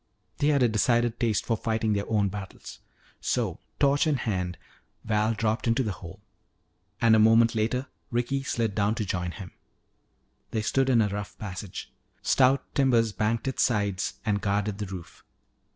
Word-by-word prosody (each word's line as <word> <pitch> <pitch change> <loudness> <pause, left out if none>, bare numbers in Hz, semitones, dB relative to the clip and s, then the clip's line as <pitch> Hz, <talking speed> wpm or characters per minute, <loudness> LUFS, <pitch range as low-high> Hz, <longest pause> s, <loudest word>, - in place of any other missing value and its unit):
They 145 - +2
had 140 -3 +3
a - - +5
decided 120 +1 +1
taste 115 -4 +1
for 115 - +1
fighting 110 -1 0
their 100 0 -2
own 105 -3 +2
battles. 95 -1 -8 0.4
So, - - -1 0.2
torch 140 +2 +3
in 150 - +2
hand, 90 -8 -2 0.5
Val 110 +1 +1
dropped 110 +2 -1
into 115 +3 +2
the 110 - -2
hole. 85 -1 -10 0.8
And 115 -1 +5
a - - +5
moment 115 +1 +5
later 115 +4 0 0.2
Ricky 125 +3 -1
slid 115 -5 -1
down 105 +2 +1
to 110 -3 -2
join 90 -2 -2
him. 90 +1 -8 1.0
They 110 -1 -2
stood 135 +4 +1
in 120 -3 +5
a - - +1
rough 105 +1 -5
passage. 95 -2 -7 0.3
Stout 135 +1 +4
timbers 120 -5 +3
banked 110 +3 -1
its 130 - -1
sides 100 -5 0
and 100 -2 +1
guarded 100 0 -1
the 105 - -3
roof. 90 -3 -9
110 Hz, 170 wpm, -27 LUFS, 100-120 Hz, 1.0 s, a